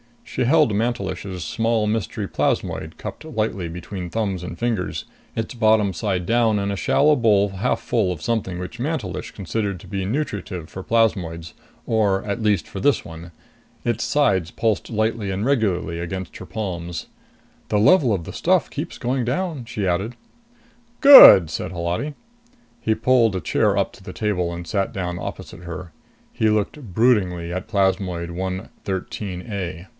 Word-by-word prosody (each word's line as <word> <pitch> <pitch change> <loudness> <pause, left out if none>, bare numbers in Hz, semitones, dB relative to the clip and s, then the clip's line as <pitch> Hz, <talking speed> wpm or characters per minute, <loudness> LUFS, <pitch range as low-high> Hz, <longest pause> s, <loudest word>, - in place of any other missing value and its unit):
She - - -2
held 150 -3 +4
Mantelish's 100 -5 -2
small 115 +5 0
mystery 105 -1 -2
plasmoid 80 -4 -2
cupped - - -7
lightly 110 - -2
between 90 +2 -6
thumbs 100 -4 -2
and 90 - -6
fingers, 115 -6 -2 0.3
its 115 +2 -3
bottom 110 -4 +3
side 95 -1 -2
down 115 -1 +2
in 100 0 -1
a 100 - -3
shallow 150 +9 +3
bowl 105 -4 +3
half 100 +6 -1
full 100 -6 0
of 85 - -10
something 105 -5 -1
which 90 +6 -7
Mantelish 150 +2 -3
considered 100 0 -3
to - - -13
be 95 0 -3
nutritive 100 - -3
for 95 - -7
plasmoids, 90 -8 0 0.3
or 105 -4 +1
at 105 +2 -3
least 105 -6 +2
for - - -7
this - - +2
one. 80 +1 -10 0.5
Its 120 -2 -1
sides 95 - +2
pulsed 110 -3 -1
lightly 110 -2 -1
and 95 +3 -2
regularly 100 -10 0
against 95 +2 -5
her 95 - -9
palms. 85 -3 -5 0.6
"The 105 - +1
level 125 - +5
of 90 -4 -2
the - - -8
stuff - - +2
keeps - - -5
going 125 0 -1
down," 150 0 -2
she 105 -3 -3
added. 95 +7 -1 0.9
"Good," 265 - +11
said 90 +3 -4
Holati. 90 - -2 0.7
He 110 - +1
pulled 115 -3 +3
a 95 - -2
chair - - +1
up - - +1
to - - -16
the - - -8
table 90 -5 -1
and 85 0 -6
sat 95 +4 -1
down 90 -2 -3
opposite 90 - -7
her. 85 0 -7 0.4
He 110 - +1
looked 105 +6 0 0.2
broodingly 95 -8 +2
at 95 +4 -4
plasmoid 95 -4 0
113 95 +1 -5
A. 90 -2 -5
100 Hz, 160 wpm, -22 LUFS, 90-115 Hz, 0.9 s, Good